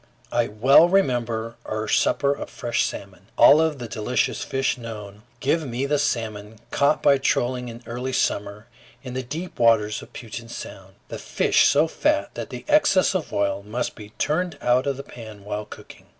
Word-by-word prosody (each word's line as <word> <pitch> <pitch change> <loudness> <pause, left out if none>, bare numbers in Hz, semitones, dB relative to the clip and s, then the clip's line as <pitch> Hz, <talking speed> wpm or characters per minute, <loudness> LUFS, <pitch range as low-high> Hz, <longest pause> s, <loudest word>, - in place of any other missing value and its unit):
I 120 -1 +1
well 135 +10 +5
remember 120 - 0
our 110 0 -4
supper 140 +6 +2
of - - -7
fresh 120 - -1
salmon. 95 -1 -6
Of - - -31
all 155 +6 +7
the 130 -6 -7
delicious 110 +3 -1
fish 135 -1 0
known, 105 -4 -9 0.2
give 155 +2 +1
me 125 +2 -2
the 145 +1 +1
salmon 110 -6 -2
caught 140 +2 +2
by 140 -1 +5
trolling 125 -1 0
in 115 +1 -10
early 125 +3 -4
summer 105 -3 -1 0.4
in 125 -2 -7
the 130 - -2
deep 155 +8 -7
waters 110 -3 +3
of - - -13
Puget 115 0 -8
Sound, 95 -4 -9
the - - -6
fish - - +3
so 150 +3 +4
fat 300 - 0
that - - -6
the - - -8
excess 295 -13 +4
of 185 -4 -3
oil 100 -1 0
must 105 +5 -3
be 105 -2 -11
turned 165 +1 -1
out 125 +2 +2
of 140 -2 -1
the 140 - -6
pan 110 -6 -11
while 105 0 -4
cooking. - - -13
120 Hz, 180 wpm, -23 LUFS, 110-140 Hz, 0.4 s, all